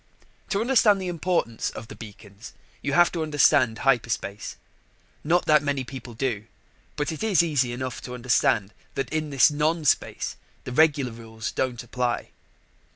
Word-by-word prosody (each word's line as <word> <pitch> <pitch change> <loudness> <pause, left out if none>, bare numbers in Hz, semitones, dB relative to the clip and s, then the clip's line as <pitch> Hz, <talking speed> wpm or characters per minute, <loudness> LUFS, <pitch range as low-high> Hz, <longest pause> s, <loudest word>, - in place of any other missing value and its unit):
To 200 - 0
understand 225 -5 +4
the 185 -1 -3
importance 170 -9 -1
of 110 - -9
the - - -10
beacons, 105 0 -12 0.3
you 145 - -2
have 175 +3 +5
to 170 - -3
understand 140 -6 +3
hyperspace. 115 -5 -1 0.7
Not 175 +4 +2
that 150 -1 +5
many 145 -2 -1
people 125 -2 -9
do, 115 -4 -2 0.5
but 145 +2 -1
it 160 - -6
is 205 -6 +3
easy 140 -7 +1
enough 130 0 -5
to 125 - -7
understand 115 -4 +1 0.2
that 135 +2 -3
in 155 -1 -1
this 140 +1 +5
non 155 +2 0
space - - 0 0.3
the - - -6
regular 145 -2 +3
rules 115 0 -7
don't 125 -2 -2
apply. 120 0 -2
135 Hz, 160 wpm, -25 LUFS, 120-155 Hz, 0.7 s, have